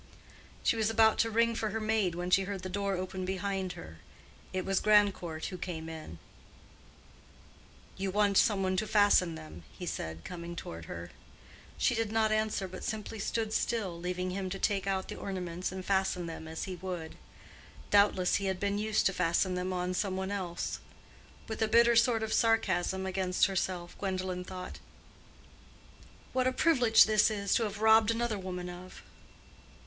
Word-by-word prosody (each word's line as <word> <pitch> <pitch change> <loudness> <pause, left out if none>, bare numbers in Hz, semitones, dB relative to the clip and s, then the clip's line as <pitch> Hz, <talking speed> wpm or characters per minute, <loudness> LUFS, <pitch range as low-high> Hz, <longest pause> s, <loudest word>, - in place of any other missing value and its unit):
'" - - -23
She - - +3
was 220 -1 +1
about 220 0 +4
to 230 - +3
ring 230 +1 +2
for 220 -1 -2
her 220 +2 -2
maid 215 -5 +1
when 175 +1 -4
she 195 +1 +4
heard 195 -1 -5
the 185 - -4
door 200 +1 -1
open 185 +1 -4
behind 190 0 -2
her. 80 0 -11 0.5
It 185 -1 -2
was 195 -1 +1
Grandcourt 200 -6 +2
who 185 - -7
came 160 -3 -5
in. 160 - -8 1.8
"You 195 0 -2
want 205 +1 +2
some 205 -4 +3
one 185 0 +1
to 215 - 0
fasten 205 -5 +4
them," 155 - -10 0.2
he - - -6
said, 80 +1 -5
coming 170 -1 -6
toward 85 - -7
her. 85 +1 -7 0.7
She - - +2
did 225 -2 -1
not 220 -1 +2
answer, 215 -3 0
but 185 0 -9
simply 220 0 -4
stood 220 +1 -2
still, 220 -7 -1
leaving 180 +1 -3
him 190 0 -3
to 195 - -4
take 195 -1 0
out 190 -1 -1
the - - -7
ornaments 180 -2 -4
and 185 0 -6
fasten 190 -2 +1
them 165 -1 -7
as 160 0 -5
he 185 - -5
would. 175 -3 -5 0.8
Doubtless 200 -3 +4
he 200 - -3
had 190 -1 -1
been 200 +1 0
used 215 0 +1
to 195 - +3
fasten 180 +1 +1
them 180 +1 -2
on 180 0 -1
some 190 0 -1
one 190 +1 -3
else. 185 -4 -3 0.7
With 220 0 -5
a 220 - +3
bitter 235 +2 +5
sort 230 -1 +4
of 220 - -2
sarcasm 190 -4 +2
against 185 -1 +1
herself, 185 -2 -2
Gwendolen 185 -2 -3
thought, 185 0 -7 1.5
"What 255 0 +2
a - - +3
privilege 255 -5 +5
this 215 0 +4
is, 200 -2 -1
to 230 - +2
have 210 0 -5
robbed 220 0 +6
another 230 -2 0
woman 180 -1 -5
of!" 180 +1 -10
190 Hz, 180 wpm, -31 LUFS, 180-215 Hz, 1.8 s, robbed